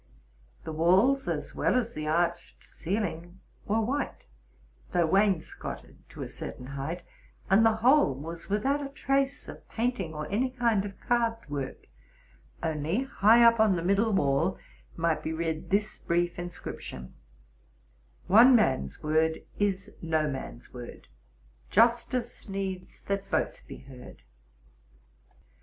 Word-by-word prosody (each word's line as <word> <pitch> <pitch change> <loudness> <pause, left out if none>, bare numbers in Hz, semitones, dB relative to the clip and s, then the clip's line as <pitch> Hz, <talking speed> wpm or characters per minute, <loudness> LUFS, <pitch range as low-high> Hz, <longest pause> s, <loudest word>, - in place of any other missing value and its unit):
The - - -5
walls 190 - +3
as - - -3
well - - +1
as 235 -2 0
the 155 0 -4
arched 170 +2 -1
ceiling 175 -1 -4 0.3
were 220 +2 +2
white, 270 +6 -2 0.7
though 175 -1 +3
wainscoted 195 0 -1
to - - -7
a - - -5
certain 125 - -7
height; 155 +6 -4 0.5
and 200 +4 +6
the 225 -1 +4
whole 260 - +5
was 165 +5 -8
withont 270 +8 0
a 275 - -5
trace 275 0 -1
of - - -11
painting, 220 -9 -2
or 150 0 -4
any 245 +6 +1
kind 235 -5 +1
of 195 -1 -8
carved 230 -1 0
work; 140 -2 -5 0.8
only, 160 - 0
high 235 -2 +5
up 230 -1 +6
on 215 -3 +5
the 170 - -2
middle 200 +5 +2
wall, 140 -8 +1 0.4
might 165 -1 +1
be 160 - -3
read 160 -1 -3
this 210 +2 0
brief 175 0 0
inscri 175 0 -6
ption: 65 0 -8 0.6
—: - - -35
One 235 +7 +7
man's 130 - +1
word 160 +1 +1 0.2
is 200 0 0
no 160 -2 +1
man's 130 -3 -7
word: 120 -1 -10 0.6
Justice 235 +1 +1
needs 190 -2 -5
that 200 0 -3
both - - -1
be - - -8
heard. 130 -2 -13
190 Hz, 140 wpm, -28 LUFS, 160-225 Hz, 0.8 s, One